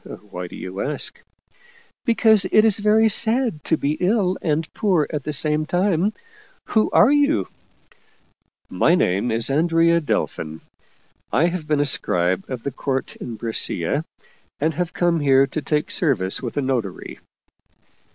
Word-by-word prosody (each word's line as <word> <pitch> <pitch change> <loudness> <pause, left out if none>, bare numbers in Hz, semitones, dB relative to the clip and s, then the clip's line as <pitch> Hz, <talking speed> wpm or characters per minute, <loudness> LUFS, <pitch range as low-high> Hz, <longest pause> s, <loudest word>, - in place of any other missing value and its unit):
Why 90 0 -5
do - - -11
you 95 +2 -6
ask?" 150 +1 -3 0.4
" 475 -1 -30
Because 220 -4 +4
it 215 - +5
is 215 -2 +3
very 215 +2 +4
sad 225 - +1
to 160 - +1
be 145 +1 -2
ill 190 -1 +1
and 155 -1 -1
poor 185 -8 +1
at 150 - -2
the 150 - -2
same 150 +1 +1
time. 185 +2 +1 0.6
Who 220 -1 +2
are 225 - +5
you? 290 +1 +2 0.4
" - - -33
" - - -49
My 170 - +5
name 100 - 0
is 115 +3 0
Andrea 165 +2 +3
Delfin. 80 - -3 0.7
I 160 - +3
have 165 -4 -5
been 150 -2 +1
a 145 - +2
scribe 90 -9 0
of 125 -3 -5
the 140 - -3
court 135 +1 -3
in 120 - -7
Brescia, 110 - -2 0.6
and 155 +3 0
have 180 +1 -3
come 175 -2 +1
here 135 -2 +4
to 150 +3 -5
take 150 +2 -1
service 105 - +1
with 120 0 -6
a 145 - +1
notary." 120 -8 -3
155 Hz, 160 wpm, -21 LUFS, 135-195 Hz, 0.7 s, it